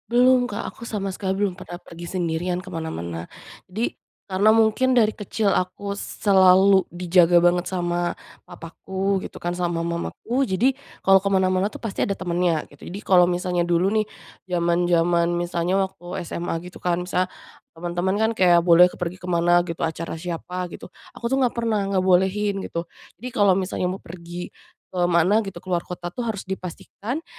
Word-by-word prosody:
Belum 250 +1 +4
Kak, 205 - -5
aku - - -20
sama 195 -4 -3
sekali 190 0 -2
belum 195 -3 0
pernah 180 -1 -9
pergi 170 -1 -10
sendirian 175 +1 -1
ke 185 - -10
mana-mana. 85 - -5 0.4
Jadi, 215 +6 -2 0.4
karena 205 +4 +4
mungkin 225 +4 +3
dari 220 -3 +4
kecil 210 0 -1
aku 185 +2 -2
selalu 190 -1 +4
dijaga 175 -1 +3
banget 175 0 +3
sama 175 -1 -1 0.3
papaku 190 +3 -3
gitu - - -13
kan, 175 - -1
sama 175 -1 -1
mamaku, 220 +10 -2
jadi 220 +7 +2 0.3
kalau 195 0 +6
ke 200 - -3
mana-mana 190 0 +2
tuh 215 - -10
pasti 220 -4 -1
ada 200 - -1
temennya, 175 -3 0
gitu. 145 - -13
Jadi 190 +4 -6
kalau 180 -2 +5
misalnya 175 -1 0
dulu 175 +3 +2
nih, 215 -1 +1 0.4
zaman-zaman 170 -1 +2
misalnya 175 +1 -1
waktu 185 -1 -6
SMA 170 0 -4
gitu 180 0 -11
kan, 180 0 0
misalnya 180 0 0 0.5
teman-teman 175 +3 -1
kan 220 +2 +2
kayak 175 -5 +4
boleh 175 +1 +7
ke - - -11
pergi 180 +1 -4
kemana 175 0 +2
gitu, 165 -1 -4
acara 165 +1 -3
siapa 180 +2 -5
gitu, - - -9 0.2
aku 235 - -5
tuh 265 - +1
enggak 245 - 0
pernah 220 -3 0
ngebolehin, 190 +2 +2
gitu. 170 0 -4 0.3
Jadi 250 +4 -5
kalau 205 -2 +5
misalnya 185 -1 0
mau 190 - -6
pergi 175 +1 -8 0.4
ke 185 - -4
mana 175 +5 +4
gitu, 195 -4 -5
keluar 180 -2 0
kota 175 -1 -6
tuh - - -10
harus 210 -3 -3
dipastikan 195 - -6
180 Hz, 170 wpm, -23 LUFS, 175-200 Hz, 0.5 s, boleh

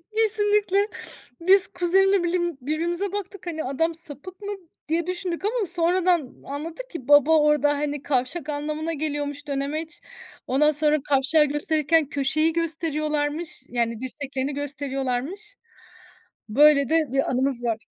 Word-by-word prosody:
Kesinlikle. 415 -2 +2 0.5
Biz 375 +2 +8
kuzenimle 385 +1 +2
bilim 345 -3 -1
birbirimize 340 +7 -2
baktık. 400 -2 -6
Hani, 320 -2 -3
"Adam 325 +5 -1
sapık 345 +4 -6
mı?" 405 0 -5 0.4
diye 335 +1 0
düşündük 365 0 -3
ama 450 0 0
sonradan 345 -3 +1
anladık 325 - -7
ki 290 - -8
baba 290 +2 +6
orda, 300 -1 +3
hani, 290 -1 -3
kavşak 290 +4 -2
anlamına 305 +2 -3
geliyormuş, 290 -1 -4
dönemeç. 305 +4 -4 0.5
Ondan 295 +4 +3
sonra 300 0 +3
kavşağı 290 +3 +3
gösterirken 300 +1 +1
köşeyi 310 +3 +1
gösteriyorlarmış, 305 -2 -2
yani, 230 -2 -1
dirseklerini 270 +1 -4
gösteriyorlarmış. 280 +6 -4 0.9
Böyle 280 +3 +5
de 320 -1 +3
bir 275 - +1
anımız 255 -1 -1
var. 230 -2 0
310 Hz, 125 wpm, -24 LUFS, 285-345 Hz, 0.9 s, Biz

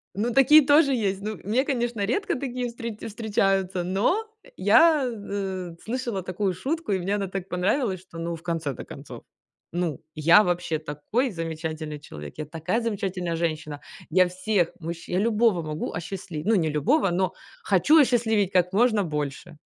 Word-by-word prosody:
Ну, 225 +5 0
такие 295 +4 +7
тоже 290 0 +5
есть. 195 -5 -1
Ну, 215 -1 -5
мне, 225 +7 +1
конечно, 240 -6 -1
редко 400 - 0
такие 250 -2 -3
встре 235 -2 -6
встречаются, 195 -4 0
но, 205 - +1 0.2
э, - - -17
я, 315 -4 +5
э, 195 -5 -5
слышала 235 -4 -3
такую 185 +1 -2
шутку, 285 - -3
и 190 - +1
мне 195 +3 -1
она 200 -1 -2
так 190 0 -5
понравилась, 190 +2 0
что, 175 -3 -11
ну, 170 0 -3
в 165 - -13
конце-то 165 -6 -3
концов, - - -10 0.5
ну, 170 -4 -2
я 165 +7 +6
вообще 175 -3 -1
такой 155 - -2
замечательный 160 -3 -5
человек, 75 - -10
я 155 - -4
такая 165 - -2
замечательная 190 -6 -2
женщина, 155 -3 -3 0.3
я 185 +2 +5
всех 185 -1 0
мужчин 170 +1 -5
я - - +3
любого 220 -6 +2
могу 155 0 -4
осчастливить, 170 -2 -6
ну, 225 - +3
не 165 -5 +2
любого, 165 - +2
но 185 +2 0 0.3
хочу 200 - +4
осчастливить 225 -7 +2
как 180 -1 +2
можно 220 0 +3
больше. 150 0 -4
190 Hz, 165 wpm, -25 LUFS, 170-230 Hz, 0.5 s, такие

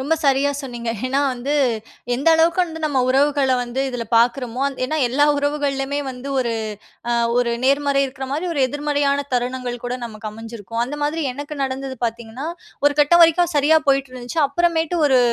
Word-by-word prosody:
ரொம்ப 290 +5 +1
சரியா 275 +1 +3
சொன்னீங்க. 240 -3 -4 0.2
ஏன்னா, 270 +2 +1
வந்து 255 +4 -3 0.6
எந்த 275 +6 +1
அளவுக்கு 335 +3 +3
வந்து 320 -2 -8
நம்ம 280 -3 0
உறவுகள 275 0 +3
வந்து 245 +2 -3
இதில 245 -2 -4
பார்க்குறமோ, 245 +1 +1
அந் 275 - -9
ஏன்னா, 310 +5 -2
எல்லா 285 +4 +3
உறவுகள்லயுமே 285 -1 -1
வந்து 250 +2 -8
ஒரு 235 -2 -1 0.6
அ - - +2 0.3
ஒரு 245 -1 +1
நேர்மறை 280 +1 +2
இருக்கிற 265 0 -6
மாரி 300 +5 -2
ஒரு 285 - -1
எதிர்மறையான 285 0 0
தருணங்கள் 250 0 -1
கூட 245 - -2
நமக்கு 215 -1 -7
அமைஞ்சிருக்கும். 225 0 -8
அந்த 265 - -6
மாதிரி 305 +2 -1
எனக்கு 290 +3 -7
நடந்தது 265 0 -3
பார்த்தீங்கன்னா, 235 +4 -4 0.4
ஒரு 290 - +5
கட்டம் 320 +4 +5
வரைக்கும் 335 +1 +4
சரியா 295 +2 +4
போயிட்டு 275 -1 +2
இருந்துச்சு. 250 +5 -6
அப்புறமேட்டு 330 +3 0
ஒரு 260 -2 +4
275 Hz, 170 wpm, -21 LUFS, 245-290 Hz, 0.6 s, ஒரு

